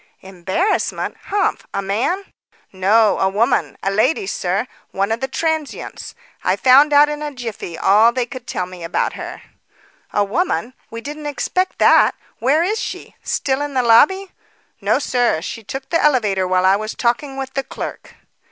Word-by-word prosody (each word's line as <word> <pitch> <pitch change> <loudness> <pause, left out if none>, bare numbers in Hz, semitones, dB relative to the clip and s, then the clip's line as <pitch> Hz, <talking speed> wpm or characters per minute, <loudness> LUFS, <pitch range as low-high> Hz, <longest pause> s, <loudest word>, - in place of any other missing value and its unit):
"Embarrassment? 190 - -2
Humph! 410 0 -1
a 200 - 0
man?" 245 - -1 0.5
"No, 205 +4 +3
a 190 - +2
woman; 230 +6 0
a 195 - +1
lady, 260 - +1
sir; - - -1 0.2
one 195 +2 -1
of 225 - 0
the 265 - -2
transients. 315 +1 -3 0.3
I - - +2
found 275 +4 +6
out 290 +1 +6
in 295 0 -4
a 300 -1 -3
jiffy 230 -9 -6
all 215 +4 +5
they 250 0 -1
could 250 0 -10
tell 180 - -2
me 180 -1 -10
about 165 +2 -1
her." - - -8 0.7
"A 205 - +2
woman! 255 - -1 0.2
We 230 0 -7
didn't 295 +3 -6
expect 365 +7 -1
that. - - +5 0.2
Where 285 +7 +3
is 420 +5 0
she? - - -6
Still 270 -1 -1
in 290 -1 -4
the 255 - +2
lobby?" 380 +12 +4 0.5
"No, - - +2
sir. 245 -10 +1
She 220 +6 -6
took 270 +5 -7
the 330 - +2
elevator 210 -10 +2
while 185 0 +2
I 190 +1 +5
was 215 +1 -5
talking 270 +3 -1
with 270 0 -5
the 275 - 0
clerk." - - -8
250 Hz, 170 wpm, -19 LUFS, 205-295 Hz, 0.7 s, found